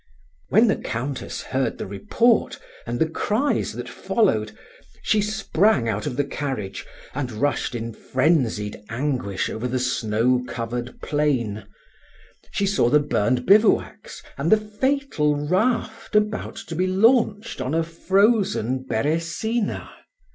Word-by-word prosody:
When 220 +4 +5
the 210 - +2
Countess 130 +3 -4
heard 130 0 -1
the - - -5
report 220 - +1 0.3
and 120 +1 -2
the 160 - +2
cries 215 - 0
that - - -6
followed, 110 - 0 0.5
she 215 - +2
sprang 210 - +1
out 110 +3 -2
of 130 -4 -4
the 145 - +2
carriage, 135 -8 -4 0.3
and 130 -3 -3
rushed 125 +2 -1
in 115 0 -4
frenzied 130 -8 0
anguish 120 -5 -1
over 115 +3 -3
the 125 +1 -1
snow 125 -1 +1
covered 120 +1 -5
plain; 120 -9 0 0.8
she 200 +2 -1
saw 195 -11 +2
the 150 +4 +5
burned 125 -3 0
bivouacs 210 +2 +2 0.2
and 145 +4 0
the 220 - +8
fatal 215 - 0
raft 215 +9 -1
about 210 0 +1
to 165 - -7
be 185 +3 +1
launched 220 +2 +2
on 130 +5 -1
a 165 - +2
frozen 190 - +1
Beresina. 165 - -1
145 Hz, 130 wpm, -23 LUFS, -, 0.8 s, the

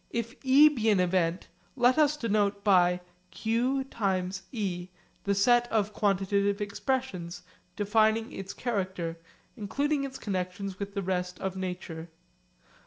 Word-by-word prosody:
If 235 0 -3
e 275 +3 +7
be 235 -7 +1
an 205 -3 +4
event, 180 -1 +1 0.3
let 250 +2 +4
us 300 0 +4
denote 205 -5 0
by 180 -3 +4 0.3
q(e) 245 +4 0 1.4
the 200 0 +2
set 240 +4 +3
of 210 -2 +1
quantitative 200 0 +1
expressions 200 -5 -3 0.3
defining 220 +2 +2
its 195 0 -6
character 185 -8 -3 0.4
including 280 +7 -1
its 270 -1 -5
connexions 190 -1 -4
with 200 0 -5
the 200 - -1
rest 180 -1 -2
of 190 -1 -3
nature. 180 -3 -5
200 Hz, 120 wpm, -29 LUFS, 185-240 Hz, 1.4 s, e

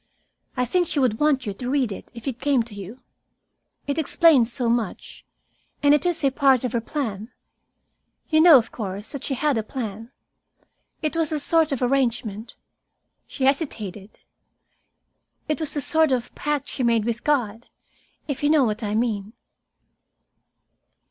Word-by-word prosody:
"I 250 - +1
think 355 +7 +1
she - - -3
would 250 -6 +1
want 295 -3 +2
you 205 - -3
to 245 +5 -5
read 265 -5 +1
it 195 - -8
if 235 +3 -9
it 255 -2 -3
came 275 -4 +2
to 225 -2 -13
you. 205 +5 -9 0.8
It 285 +2 -1
explains 300 -6 +4
so 245 -1 -1
much. 230 -4 -2 0.6
And 285 0 +6
it 295 +3 +2
was 340 -3 -1
a 275 - +3
part 270 -2 +3
of 250 - -1
her 235 - 0
plan. 225 -4 -4 1.0
You 315 -1 +4
know, 325 -4 +9
of 230 - -1
course, 205 -1 -6
that 280 - -7
she 270 - -2
had 285 -3 +1
a - - -3
plan. 225 -1 -6 0.9
It 310 +1 -1
was 325 -2 0
a 305 - -1
sort 320 +1 +2
of 265 -2 -1
arrangement" 240 -4 -1 0.7
she 270 - -6
hesitated 220 - -2 1.3
"it 305 +1 -1
was 315 -2 -3
a - - 0
sort 315 +1 +2
of 245 -2 -1
pact 295 -2 -2
she - - -4
made 230 -3 +2
with 235 0 -2
God, 240 -6 -1 0.6
if 280 -3 -4
you 290 - +2
know 305 -2 +5
what 215 -2 -1
I 210 -1 -2
mean." 215 -2 -1
255 Hz, 170 wpm, -23 LUFS, 225-290 Hz, 1.3 s, know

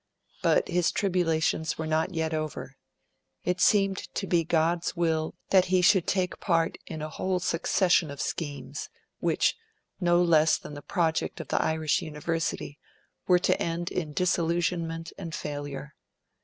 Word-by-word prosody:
But, - - +3
his 175 -1 +1
tribulations 165 -4 0
were 160 - -3
not 160 +3 0
yet 160 0 -1
over. 155 -1 -4 0.7
It 180 0 -1
seemed 195 -2 +4 0.2
to 195 - -1
be 175 -3 +2
God's 165 +1 +1
will 160 -2 0 0.2
that 185 -2 +6
he 185 0 +2
should 190 -2 +5
take 185 -2 0
part 165 -3 +1
in 155 -1 -5
a 155 - -4
whole 185 +5 -1
succession 175 -1 +2
of 140 -1 -8
schemes, 145 -3 -4 0.3
which, - - +2 0.4
no 175 -2 +3
less 160 -2 +4
than - - -10
the 145 - -7
project 160 +2 -1
of - - -7
the - - +2
Irish 160 -1 +1
University, 155 -1 -3 0.5
were 180 - +6
to 180 - +1
end 170 +1 -2
in 160 -5 -3
disillusionment 170 0 0
and 165 -5 -5
failure. 145 0 -5
165 Hz, 150 wpm, -28 LUFS, 155-180 Hz, 0.7 s, that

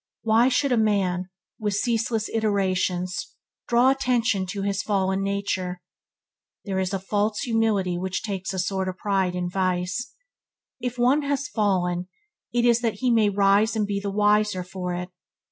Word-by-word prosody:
Why 225 +3 +4
should 270 +2 +1
a 245 - +3
man, 190 -4 +1 0.3
with 210 -2 -1
ceaseless 225 0 0
iterations, 185 -4 -1 0.3
draw 240 +2 +4
attention 235 -7 +1
to 195 +1 -4
his 200 0 0
fallen 190 -2 0
nature? 195 -2 -2 0.9
There 190 -2 -1
is 190 0 -1
a 195 - 0
false 205 +3 -1
humility 215 -6 +1
which 185 0 -3
takes 195 -3 -3
a 190 - -4
sort 190 +1 -1
of 185 - -6
pride 190 -2 0
in 180 0 -2
vice. 185 +5 -2 0.6
If 250 0 -4
one 255 +5 +3
has 285 0 -1
fallen, 180 -6 0 0.4
it 240 0 +1
is 240 0 +4
that 225 -3 0
he 250 +4 0
may 220 -3 +4
rise 200 +3 +3
and 215 -1 +1
be 200 -1 -2
the 200 0 -3
wiser 210 -1 +2
for 180 0 -4
it. 180 +1 -5
200 Hz, 160 wpm, -25 LUFS, 185-225 Hz, 0.9 s, Why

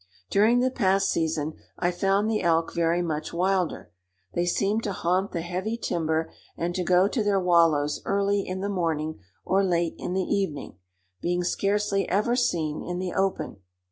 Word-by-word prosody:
During 225 +5 +4
the 255 +1 +2
past 195 -5 +2
season 160 -2 -1 0.2
I 175 0 +1
found 195 +3 +1
the 220 -1 0
elk 165 -1 +1
very 170 +1 +1
much 155 -2 -3
wilder. 185 0 0 0.4
They 175 0 0
seemed 200 +5 +1
to 200 - -1
haunt 185 +3 0
the 170 - -2
heavy 185 +6 -3
timber, 160 -6 -1 0.3
and 170 +1 -2
to 180 - -1
go 180 +2 +4
to 220 +1 -1
their 205 -1 +2
wallows 165 -5 +3
early 200 0 +1
in 185 0 -5
the 200 - -1
morning 160 - -1 0.3
or 195 +1 +2
late 170 -3 +1
in 180 - -3
the 190 - +1
evening, 165 - -2 0.4
being 175 +1 0
scarcely 200 +2 0
ever 215 +6 +2
seen 160 -11 0
in 175 0 -4
the 180 0 -3
open. 190 - -1
180 Hz, 170 wpm, -26 LUFS, 170-200 Hz, 0.4 s, During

